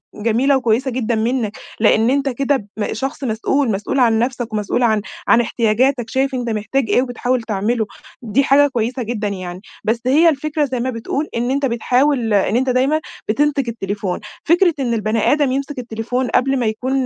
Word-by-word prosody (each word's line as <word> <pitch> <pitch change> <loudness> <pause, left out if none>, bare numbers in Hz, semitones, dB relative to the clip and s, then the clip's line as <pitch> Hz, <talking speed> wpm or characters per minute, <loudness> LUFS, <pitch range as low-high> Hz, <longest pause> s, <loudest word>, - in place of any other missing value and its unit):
جميلة 235 +6 +2
وكويسة 250 +2 +1
جدًا 235 -2 -1
منك، 225 -1 -1 0.2
لأن 220 +1 +4
أنت 275 0 +1
كده 270 -3 -1
م 210 - -2
شخص 270 +5 -4
مسؤول، 245 +2 0
مسؤول 205 +7 -1
عن 225 -3 +4
نفسك، 240 -2 -2
ومسؤول 210 +4 0
عن 220 -3 +3 0.3
عن 235 - +5
إحتياجاتك، 235 +2 +1
شايف 265 +2 0
أنت 245 -2 -2
محتاج 220 +3 -1
إيه 245 - +4
وبتحاول 250 0 -1
تعمله، 220 +1 -1 0.4
دي 245 +4 +1
حاجة 285 +2 +5
كويسة 245 0 -2
جدًا 215 -2 -3
يعني. 185 -2 -6 0.2
بس 230 +2 0
هي 315 +6 +5
الفكرة 300 0 -1
زي 255 -2 -3
ما 255 +2 -1
بتقول 255 +5 -3
إن 245 +2 0
أنت 280 0 +1
بتحاول 245 0 +1
إن 200 +2 +2
أنت 260 +1 +1
دايمًا 265 +5 +2 0.3
بتمسك 280 +2 +1
التليفون، 200 -4 -3 0.3
فكرة 345 +1 +4
إن 245 -3 0
البني 215 0 +1
آدم 290 -3 +2
يمسك 275 +1 -3
التليفون 245 +2 -3
قبل 270 +2 +1
ما 240 - 0
يكون 255 +4 -1
245 Hz, 180 wpm, -19 LUFS, 220-270 Hz, 0.4 s, عن